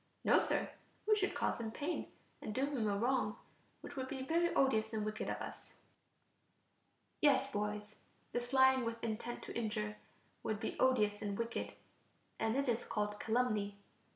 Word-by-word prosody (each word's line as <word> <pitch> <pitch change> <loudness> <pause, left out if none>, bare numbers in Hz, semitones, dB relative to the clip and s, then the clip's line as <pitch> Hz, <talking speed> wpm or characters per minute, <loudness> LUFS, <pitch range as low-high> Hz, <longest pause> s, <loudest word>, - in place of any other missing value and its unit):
No, - - +6
Sir, - - +1 0.3
we 430 0 +5
should 395 -2 0
cause - - 0
him 225 -1 -2
pain, 290 +9 -2 0.3
and 210 - -4
do 265 - +2
him 270 -7 0
a 200 - +1
wrong, 235 -2 +1 0.4
which - - -8
would 260 -1 -2
be 265 -1 -4
very 340 +5 +2
odious 220 -5 +3
and 215 -1 0
wicked 215 0 -2
of - - -1
us. - - -8 1.5
Yes, 275 -2 +4
boys, 210 -1 -3 0.3
this 245 0 -2
lying 265 -1 +6
with 230 0 -3
intent 230 +1 -3
to - - -7
injure 160 - -1 0.4
would 215 -1 -1
be 220 - -3
odious 210 -6 +3
and 200 -1 -2
wicked, 230 0 -2 0.7
and 225 +1 +1
it 275 0 +1
is 240 -1 +1
called 210 -1 -2
calumny. 215 -4 +1
230 Hz, 165 wpm, -36 LUFS, 210-265 Hz, 1.5 s, No